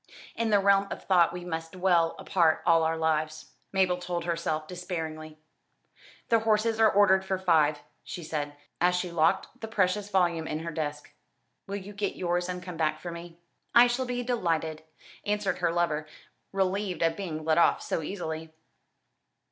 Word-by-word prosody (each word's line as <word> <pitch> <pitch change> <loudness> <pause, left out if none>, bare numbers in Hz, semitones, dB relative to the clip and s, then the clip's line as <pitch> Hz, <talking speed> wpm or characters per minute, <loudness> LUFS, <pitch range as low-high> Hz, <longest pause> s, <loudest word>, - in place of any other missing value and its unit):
"In 230 -1 0
the 210 - +5
realm 200 0 +4
of - - -6
thought 175 -3 +4
we 175 0 -7
must 165 -1 -5
dwell 175 -3 +2
apart 165 -4 +2
all 165 -1 +5
our 160 0 +1
lives," 155 -1 -1 0.2
Mabel 185 -2 +2
told 175 -1 -3
herself 165 -2 -2
despairingly. 160 -3 -6 0.9
"The 230 - +5
horses 220 0 +1
are 220 -1 +6
ordered 190 -2 +4
for 190 0 -1
five," 155 -5 +2 0.2
she 175 - -7
said, 145 -2 -4 0.3
as 180 +1 +4
she 180 -1 -2
locked 165 -1 +1
the 225 - -4
precious 205 -1 0
volume 175 -4 +1
in 155 +1 -3
her 170 0 -4
desk; 150 -2 -4 0.6
"will 200 - -4
you 200 +1 -7
get 200 -1 -2
yours 175 0 -1
and 180 0 -4
come 180 -2 -7
back 155 -1 0
for 175 - -6
me?" 170 0 -9 0.4
"I 240 +1 +9
shall 245 +2 0
be 245 0 -2
delighted," 165 -10 -1 0.4
answered 205 -1 -1
her - - +1
lover, 160 -3 0 0.4
relieved 195 -1 -1
at 165 0 +2
being 160 -5 -5
let 160 +1 +3
off - - +3
so - - -2
easily. 160 -2 -5
175 Hz, 170 wpm, -28 LUFS, 160-195 Hz, 0.9 s, I